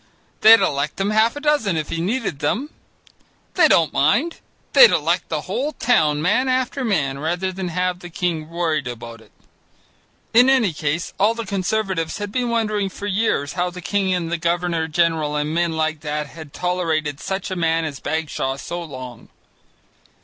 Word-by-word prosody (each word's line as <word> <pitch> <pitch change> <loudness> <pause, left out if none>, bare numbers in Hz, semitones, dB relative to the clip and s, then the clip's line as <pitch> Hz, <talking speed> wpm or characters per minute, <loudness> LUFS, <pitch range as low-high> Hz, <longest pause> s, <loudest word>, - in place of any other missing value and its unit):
They'd 225 0 +8
elect 140 -5 -1
him 195 +2 0
half 220 +3 +3
a - - -5
dozen 290 - +1
if 155 - -3
he 165 - -2
needed 200 - -2
them. 235 - -1 0.8
They 355 - +5
don't 160 -3 +3
mind; 230 - +1 0.3
they'd 480 - +9
elect - - 0
the - - -2
whole 295 +3 -3
town 150 -11 +2
man 210 +9 +2
after 255 +1 0
man 145 - 0
rather 175 +5 -1
than 185 0 -5
have 180 +1 -1
the 175 - -10
king 165 -2 -2
worried 165 -5 -1
about 115 -1 -8
it. - - -21 1.0
In 245 +3 +6
any 245 -10 +3
case, 150 +3 -2
all 215 +4 +3
the 230 -1 -5
Conservatives 190 -3 -1
had 205 -1 -5
been 245 +1 -1
wondering 215 -4 0
for 200 - -8
years 200 -8 0
how 180 0 -1
the 180 +1 -9
king 195 +1 -1
and 175 -2 -1
the 170 - 0
governor 170 -1 -1
general 160 -2 +1
and 150 +1 -1
men 170 0 +1
like 160 -1 -1
that 150 0 -3
had 155 0 -11
tolerated 160 -5 -1
such 190 +2 -4
a - - -2
man 165 -1 +1
as 140 -4 -5
Bagshaw 145 -3 -2
so 175 +4 -5
long. 130 -7 -9
175 Hz, 180 wpm, -21 LUFS, 155-205 Hz, 1.0 s, they'd